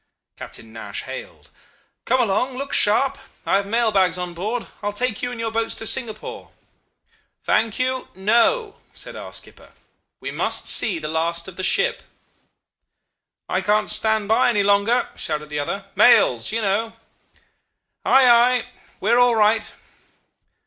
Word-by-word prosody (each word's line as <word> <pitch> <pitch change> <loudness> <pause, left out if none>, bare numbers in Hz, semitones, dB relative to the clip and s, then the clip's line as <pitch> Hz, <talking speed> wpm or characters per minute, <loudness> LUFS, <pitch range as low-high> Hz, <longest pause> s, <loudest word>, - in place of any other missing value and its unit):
Captain - - -11
Nash - - -6
hailed: - - -10 0.5
'Come 260 - +2
along! 250 +4 0
Look 275 +1 -5
sharp. 260 +6 +3 0.3
I - - +2
have 200 0 -3
mail 230 +1 +1
bags 185 -3 +2
on 180 -1 -5
board. 215 +8 -3 0.2
I 205 - -3
will 205 - -2
take 235 0 -2
you 245 - -2
and 245 -1 -7
your 225 -1 -2
boats 225 0 -2
to 225 - -7
Singapore.' 220 -2 -3 0.9
"'Thank 225 -2 +1
you! 255 0 -2
No!' 235 - +1 0.2
said - - -10
our - - -8
skipper. - - -11 0.5
'We - - -6
must - - 0
see 195 -6 +3
the 155 -1 -5
last 170 +2 -1
of 190 - -10
the 185 - -6
ship.' - - +1 1.5
"'I 185 - -1
can't 210 +2 +1
stand 220 -2 +1
by 225 +3 +3
any 210 -4 +1
longer,' 205 +5 +2
shouted 150 -1 -4
the 150 0 -3
other. 195 +7 -4
'Mails 120 - +4
you 225 0 -2
know.' 215 +3 -1 1.1
"'Ay! 265 -1 +5
ay! 245 +1 +4 0.3
We 210 - +1
are 240 - +4
all 245 -1 +4
right. 215 0 +2
220 Hz, 155 wpm, -21 LUFS, 195-245 Hz, 1.5 s, Ay